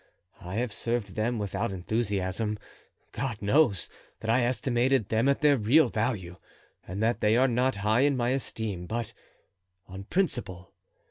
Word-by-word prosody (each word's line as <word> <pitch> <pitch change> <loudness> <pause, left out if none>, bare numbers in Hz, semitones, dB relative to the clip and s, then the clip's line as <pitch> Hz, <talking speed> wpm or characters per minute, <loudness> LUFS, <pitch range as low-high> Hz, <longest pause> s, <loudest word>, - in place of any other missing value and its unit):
I 90 +1 -6
have 115 -1 -1
served 115 -4 -2
them 115 +3 -1
without 100 -2 -2
enthusiasm—God 105 +4 -3
knows 105 - +2 0.3
that 110 - 0
I 125 +2 +3
estimated 125 -2 +1
them 115 +5 +2
at 140 - +1
their 145 -2 +5
real 125 +6 +4
value, 105 -7 -2 0.5
and 95 +4 -3
that 115 +1 +1
they 105 +2 +4
are 130 +2 +4
not 125 +2 +1
high 105 +4 +2
in 140 -1 +3
my 120 -1 +1
esteem—but 110 -3 -3 0.7
on 95 +1 -9
principle. 115 - -2
115 Hz, 140 wpm, -28 LUFS, 100-125 Hz, 0.7 s, their